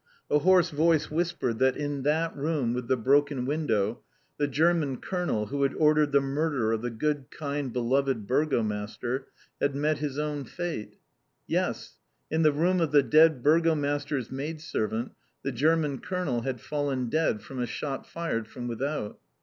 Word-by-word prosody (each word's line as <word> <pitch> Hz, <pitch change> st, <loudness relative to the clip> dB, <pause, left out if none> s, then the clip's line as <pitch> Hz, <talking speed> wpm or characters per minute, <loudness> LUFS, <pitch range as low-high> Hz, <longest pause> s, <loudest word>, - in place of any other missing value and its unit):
A 150 Hz, -, +5 dB
hoarse 180 Hz, +2 st, +4 dB
voice 155 Hz, 0 st, +2 dB
whispered 165 Hz, -8 st, -1 dB
that 130 Hz, 0 st, +3 dB
in 145 Hz, -1 st, -2 dB
that 160 Hz, +4 st, 0 dB
room 140 Hz, -5 st, 0 dB
with 125 Hz, -1 st, -3 dB
the 130 Hz, -, +2 dB
broken 140 Hz, +2 st, +2 dB
window, 120 Hz, -7 st, 0 dB, 0.4 s
the 145 Hz, -, +2 dB
German 150 Hz, -1 st, +2 dB
Colonel 175 Hz, -, -2 dB
who 140 Hz, +6 st, -3 dB
had 140 Hz, -, +1 dB
ordered 150 Hz, -1 st, +3 dB
the 140 Hz, -, +5 dB
murder 135 Hz, -4 st, 0 dB
of 110 Hz, -1 st, 0 dB
the 120 Hz, -, -2 dB
good, 140 Hz, +3 st, -2 dB
kind, 145 Hz, -3 st, -4 dB
beloved 125 Hz, -1 st, 0 dB
Burgomaster, 120 Hz, -1 st, -1 dB, 0.3 s
had 140 Hz, -1 st, +1 dB
met 150 Hz, +1 st, +1 dB
his 145 Hz, -2 st, -3 dB
own 150 Hz, -1 st, -2 dB
fate. 175 Hz, -11 st, -5 dB, 0.5 s
Yes! -, -, -2 dB, 0.3 s
In 160 Hz, -, +2 dB
the 155 Hz, -1 st, +5 dB
room 175 Hz, +5 st, +2 dB
of 160 Hz, -3 st, +1 dB
the 145 Hz, -2 st, +6 dB
dead 155 Hz, 0 st, +5 dB
Burgomaster's 145 Hz, -4 st, +1 dB
maidservant, 135 Hz, -5 st, -3 dB, 0.3 s
the 135 Hz, -, -1 dB
German 150 Hz, +1 st, +1 dB
colonel 170 Hz, -10 st, -2 dB
had 125 Hz, -1 st, -3 dB
fallen 140 Hz, -4 st, -2 dB
dead 115 Hz, -6 st, 0 dB
from 130 Hz, +2 st, -8 dB
a 120 Hz, -, -1 dB
shot 135 Hz, +3 st, -4 dB
fired 115 Hz, -10 st, -3 dB
from 120 Hz, +1 st, -7 dB
without. 120 Hz, -1 st, -3 dB
145 Hz, 160 wpm, -28 LUFS, 125-155 Hz, 0.5 s, the